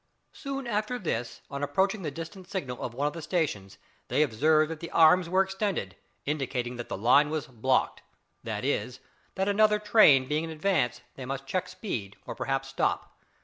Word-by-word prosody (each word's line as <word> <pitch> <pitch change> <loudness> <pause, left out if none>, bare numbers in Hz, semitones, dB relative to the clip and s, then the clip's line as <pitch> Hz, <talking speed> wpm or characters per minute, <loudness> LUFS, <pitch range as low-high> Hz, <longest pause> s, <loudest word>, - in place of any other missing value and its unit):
Soon 275 -1 -5
after 215 +2 -1
this, 120 - -3
on 140 0 -4
approaching 190 +9 +1
the 160 - -2
distant 165 +5 -9
signal 135 -11 -4
of 120 - -5
one 140 +3 -1
of 150 - 0
the 165 - -7
stations, 150 - -2 0.3
they 150 - +3
observed 155 +5 +3
that 160 - -6
the 170 - -7
arms 165 +2 +5
were 190 +2 +4
extended, 190 - -3 0.3
indicating 130 -4 -2
that 120 - -6
the - - -3
line 130 +8 +5
was 155 -1 -2
"blocked" 130 -1 0 0.4
that - - -4
is, 125 +4 -1 0.4
that 190 +1 0
another 210 +1 +4
train 210 - +5
being 150 +3 0
in 165 - -5
advance 155 -8 0 0.2
they 135 - -6
must 135 +1 -4
check 185 +5 -2
speed 155 - -5
or - - -5
perhaps 135 0 -2
stop. 135 -1 -2
155 Hz, 185 wpm, -28 LUFS, 130-190 Hz, 0.4 s, arms